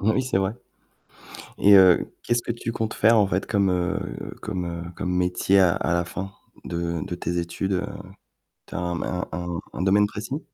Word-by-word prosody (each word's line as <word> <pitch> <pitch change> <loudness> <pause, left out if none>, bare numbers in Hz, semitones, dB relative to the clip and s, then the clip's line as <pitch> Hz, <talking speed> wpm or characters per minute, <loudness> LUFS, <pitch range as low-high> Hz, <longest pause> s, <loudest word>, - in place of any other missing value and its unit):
Oui, 110 +6 +2
c'est 130 -7 0
vrai, 95 +2 0 1.0
et 100 - +6
heu, 95 -2 +6
qu'est-ce 120 0 +1
que 120 - -3
tu 115 0 -4
comptes 110 -1 -2
faire 115 +2 +4
en 105 - +5
fait 95 0 -1
comme, 100 -3 +2
heu, 90 +1 -3
comme, 95 -4 -3
heu, 85 0 -5
comme 90 -1 -2
métier 90 +2 +2
à 90 -2 +5
à 85 - -1
la 85 0 +2
fin 95 +2 -6 0.3
de 85 -1 -2
de 90 - -4
tes 85 0 -3
études? 85 +3 -2
Heu, 95 +1 0 0.8
tu - - -11
as - - -2
un 85 -1 -2
un 90 0 -2
un 85 +2 -4 0.2
un - - -4
domaine 100 +2 +4
précis? 115 +8 -5
95 Hz, 200 wpm, -24 LUFS, 90-105 Hz, 1.0 s, et